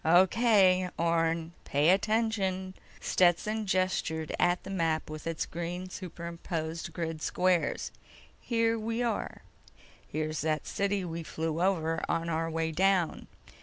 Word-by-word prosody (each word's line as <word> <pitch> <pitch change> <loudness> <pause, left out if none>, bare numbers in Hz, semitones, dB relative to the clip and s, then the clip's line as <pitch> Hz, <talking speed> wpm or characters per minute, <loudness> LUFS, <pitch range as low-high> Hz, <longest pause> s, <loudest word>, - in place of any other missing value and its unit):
"O.K., 185 +1 +5
Orne, 165 0 +1
pay 145 +3 +2
attention." 195 -2 +1 0.3
Stetson 205 +5 +2
gestured 185 -4 0
at 175 0 +2
the - - -7
map 165 -4 0
with 155 +1 -6
its 165 -1 -1
green 175 +2 -5
superimposed 170 -2 -5
grid 165 -2 -4
squares. 180 0 +1 0.5
"Here 230 -1 +1
we 230 +2 -1
are. 230 -3 -2 0.6
Here's 155 0 -2
that 155 -1 0
city 200 -1 -1
we 170 -1 -4
flew 160 0 -3
over 165 -4 +1
on 165 0 0
our 165 0 0
way 165 0 -1
down. 185 0 +1
175 Hz, 125 wpm, -30 LUFS, 165-190 Hz, 0.6 s, O.K